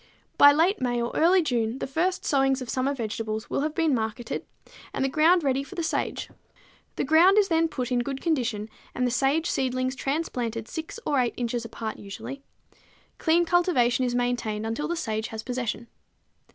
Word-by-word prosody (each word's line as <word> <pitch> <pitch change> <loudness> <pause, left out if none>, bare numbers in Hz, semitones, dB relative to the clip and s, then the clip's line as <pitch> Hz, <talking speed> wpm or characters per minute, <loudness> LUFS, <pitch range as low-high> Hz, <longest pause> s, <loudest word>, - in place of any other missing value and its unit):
By 285 - +8
late 335 +8 +2
May 245 -1 0
or 235 0 -2
early 355 +2 +4
June 235 -4 -1
the - - -3
first 355 +7 -1
sowings 270 -1 +2
of 255 -2 -5
summer 265 +2 0
vegetables 220 -2 -4
will - - 0
have 305 +1 -2
been 325 -3 +2
marketed 225 0 -3 0.5
and 270 - 0
the - - +1
ground 325 +5 +4
ready 270 -1 +1
for 385 - -11
the 340 - -2
sage. - - -2 0.7
The - - -1
ground 330 +7 +5
is 410 -2 +4
then 330 0 +3
put 255 -5 -4
in 245 - +2
good 270 +2 -3
condition 245 -10 -1 0.3
and 250 - 0
the 245 - +1
sage 280 +6 +1
seedlings 255 -3 -1
transplanted 245 -6 -2
6 320 +6 -6
or 285 -3 +2
8 245 -2 0
inches 240 -1 -2
apart 225 -1 -5
usually. 205 +7 -8 0.8
Clean 340 +1 +3
cultivation 295 -9 +2
is 245 -1 0
maintained 240 -3 -1
until 230 +7 -2
the 345 - -1
sage 220 -8 -2
has 220 -1 -7
possession. 245 -2 -3
260 Hz, 185 wpm, -26 LUFS, 235-320 Hz, 0.8 s, By